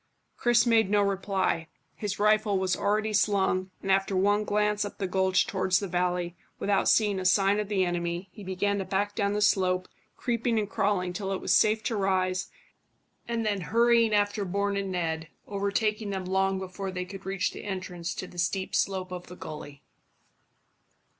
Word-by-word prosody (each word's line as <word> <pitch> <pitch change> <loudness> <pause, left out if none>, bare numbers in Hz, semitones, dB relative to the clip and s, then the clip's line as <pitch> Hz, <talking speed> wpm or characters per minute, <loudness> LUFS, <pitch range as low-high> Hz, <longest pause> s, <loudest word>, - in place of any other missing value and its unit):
Chris 240 0 +3
made 225 -4 +4
no 205 0 +3
reply. 195 -4 0 0.3
His 210 -1 -4
rifle 210 -1 +3
was 190 -1 +1
already 215 +1 0
slung, 190 -3 +2
and 195 - 0
after 195 0 +2
one 205 +3 +2
glance 210 0 +1
up 205 - -6
the 195 - -2
gulch 190 0 +2
towards 190 -1 +1
the 200 - -4
valley, 180 -1 -1 0.2
without 200 -1 +1
seeing 205 -3 +3
a - - -3
sign 195 +2 +3
of 210 - -2
the 195 -3 +1
enemy, 175 +1 -2
he 210 - -11
began 200 +2 -1
to - - -1
back 200 +2 -1
down 200 -2 0
the 210 0 +1
slope, 185 -2 +2 0.3
creeping 235 -1 0
and 210 -1 0
crawling 195 -4 0
till 195 +1 -3
it 195 - -1
was - - +2
safe 215 0 +3
to 230 - -1
rise, 185 -2 0 0.8
and 230 -1 -1
then 205 -2 0
hurrying 230 +3 +3
after 205 0 +1
Bourne 200 +2 -1
and 195 -1 -2
Ned, 165 -2 -2 0.2
overtaking 205 +1 -1
them 190 -2 -3
long 190 +1 +1
before 190 +1 -5
they 180 -1 -4
could 195 +1 -9
reach 195 -1 -1
the - - -9
entrance 180 -3 -4
to - - -4
the 180 -1 -10
steep 190 +2 -1
slope 185 -2 0
of 180 -1 -6
the 180 - -10
gully. 145 -4 -9
195 Hz, 185 wpm, -28 LUFS, 185-210 Hz, 0.8 s, made